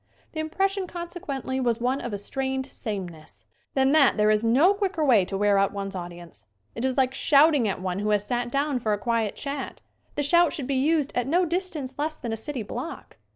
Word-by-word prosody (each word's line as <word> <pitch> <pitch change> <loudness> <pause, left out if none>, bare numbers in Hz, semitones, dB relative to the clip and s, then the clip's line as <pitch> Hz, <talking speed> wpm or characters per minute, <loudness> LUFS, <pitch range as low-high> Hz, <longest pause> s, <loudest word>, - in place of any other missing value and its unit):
The 315 - -6
impression 385 +5 -1
conse 345 0 -7
quently 265 -5 -3
was 235 -1 +1
one 255 +3 0
of 240 - -5
a 205 - -2
strained 265 +5 -3
sameness. 185 - -7 0.3
Than 265 0 +3
that 280 -6 +5
there 210 0 +4
is 215 +1 +2
no 270 - +5
quicker 390 -6 -1
way 225 -9 +5
to 195 - -4
wear 205 0 +3
out 195 +1 +1
one's 195 -1 -4
audience. 175 - -9 0.3
It 230 - -5
is 260 0 0
like 260 -1 +2
shouting 285 -3 +4
at 195 - -2
one 185 0 -2
who 210 +1 -1
has 205 -1 +1
sat 240 0 -1
down 275 0 0
for 220 -3 0
a - - 0
quiet 225 -1 -1
chat. 280 -1 -5 0.3
The 290 - 0
shout 340 +2 +4
should 295 -6 -3
be 275 - -2
used 290 +2 +1
at 245 0 -1
no 350 +5 +3
distance 335 -6 -3
less 310 +1 -2
than 235 -3 -4
a - - 0
city 240 +2 -4
block. 250 +10 -7
260 Hz, 220 wpm, -26 LUFS, 210-300 Hz, 0.3 s, that